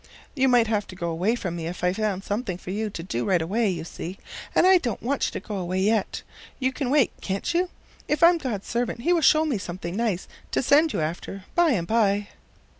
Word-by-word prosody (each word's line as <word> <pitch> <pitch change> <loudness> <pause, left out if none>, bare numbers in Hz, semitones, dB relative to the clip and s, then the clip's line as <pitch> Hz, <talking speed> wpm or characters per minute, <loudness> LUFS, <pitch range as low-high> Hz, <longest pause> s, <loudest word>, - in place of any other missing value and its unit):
You 265 -2 +2
might 245 -2 +5
have 215 -2 -1
to 185 - -10
go 170 -2 -3
away 185 +8 +1
from 180 -7 -4
me 165 -1 -4
if 175 +1 -6
I 180 0 +3
found 200 -2 -1
something 205 -3 -2
for 180 - -7
you 215 +2 -2
to 170 -4 -7
do 120 -9 -2
right 185 -3 +2
away, 205 +7 +1
you 170 -3 -3
see, 175 +3 -7 0.4
and - - +5
I 375 0 +7
don't 245 -8 -3
want 275 +3 0
you - - -4
to - - -6
go 210 -3 -3
away 185 0 -2
yet. 210 +1 +1 0.4
You 260 -1 +1
can 265 -2 -2
wait, 280 -3 +4
can't 195 - -2
you? 355 +1 +1 0.4
If 300 - +1
I'm 340 0 +7
God's 230 -9 -3
servant 235 0 -2
he 345 +8 +3
will 340 - +2
show 310 +2 +5
me 270 -9 -1
something 175 -1 -5
nice 215 -5 -1 0.2
to - - 0
send 300 +5 +4
you - - -1
after 175 +5 -4
by 345 -4 +4
and 175 -7 -1
by." 205 -1 +1
210 Hz, 240 wpm, -25 LUFS, 185-260 Hz, 0.4 s, I